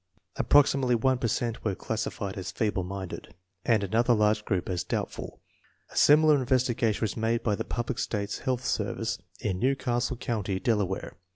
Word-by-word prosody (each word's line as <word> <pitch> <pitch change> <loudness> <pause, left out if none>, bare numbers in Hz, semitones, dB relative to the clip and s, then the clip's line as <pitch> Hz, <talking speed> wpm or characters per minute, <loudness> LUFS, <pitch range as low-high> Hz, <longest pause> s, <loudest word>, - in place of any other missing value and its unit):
Approxi 145 -1 +4
mately 125 -2 +2
one 130 +1 +2
per 120 - 0
cent 115 +1 -2
were 100 -4 0
classified 105 -2 -3
as 95 -1 -5
feeble 100 -1 -1
minded, 95 0 -7 0.3
and 110 -4 +2
another 115 +5 +3
large 105 0 +2
group 95 -3 -1
as 90 -2 -1
doubtful. - - -4 0.5
A - - -14
similar 150 0 +6
in 130 - -2
vestigation 120 -4 +1
was 110 - -1
made 115 +1 0
by 105 - +1
the - - -3
United 120 +1 -2
States 100 -2 -2
Public - - -15
Health 130 -1 -1
Service - - -1 0.2
in 95 -4 -1
New 130 +5 +2
Castle 125 -1 -1
County, 105 -6 -2
Delaware. 100 -6 -1
115 Hz, 180 wpm, -28 LUFS, 100-125 Hz, 0.5 s, similar